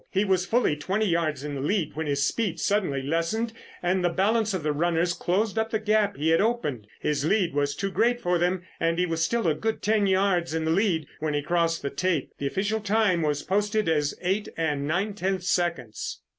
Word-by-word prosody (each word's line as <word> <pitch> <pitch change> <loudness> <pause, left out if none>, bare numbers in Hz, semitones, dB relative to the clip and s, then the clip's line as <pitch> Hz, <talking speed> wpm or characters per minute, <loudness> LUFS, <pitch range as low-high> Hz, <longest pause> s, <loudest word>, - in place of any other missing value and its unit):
He 195 +2 +1
was 185 -2 +1
fully 235 -10 +2
twenty 195 +8 -1
yards 165 -6 0
in 150 -1 -4
the 135 - -4
lead 170 +3 -1
when 160 0 -3
his 140 0 +1
speed 220 -7 -1
suddenly 180 -10 0
lessened 170 +10 -1 0.3
and 180 +1 +1
the 175 - +3
balance 215 +5 +1
of 185 -5 -3
the 150 - +1
runners 170 +3 +1
closed 205 +6 0
up 220 0 0
the 220 - 0
gap 215 -3 +1
he 155 +3 +1
had 165 - +4
opened. 150 - -1
His 150 -2 -1
lead 180 0 +2
was 145 0 0
too 195 +5 -2
great 240 +4 +2
for 180 -5 +1
them, 180 +1 0 0.2
and 165 0 +1
he 180 - +2
was 165 -2 -2
still 230 +2 0
a 160 - +3
good 220 +8 -3
ten 210 -1 +2
yards 185 -4 +1
in 160 -1 -1
the 160 - +1
lead 175 -4 +1
when 150 -1 -1
he 145 - -1
crossed 165 0 0
the 140 - -2
tape. 180 -6 -1
The 140 - -1
official 205 +8 -1
time 205 -4 +2
was 150 -2 0
posted 210 +2 0
as 150 -3 +1
eight 195 +4 0
and 150 -3 -1
nine 190 +7 0
tenths 190 -2 -1
seconds. 165 -11 -2
175 Hz, 220 wpm, -26 LUFS, 155-205 Hz, 0.3 s, had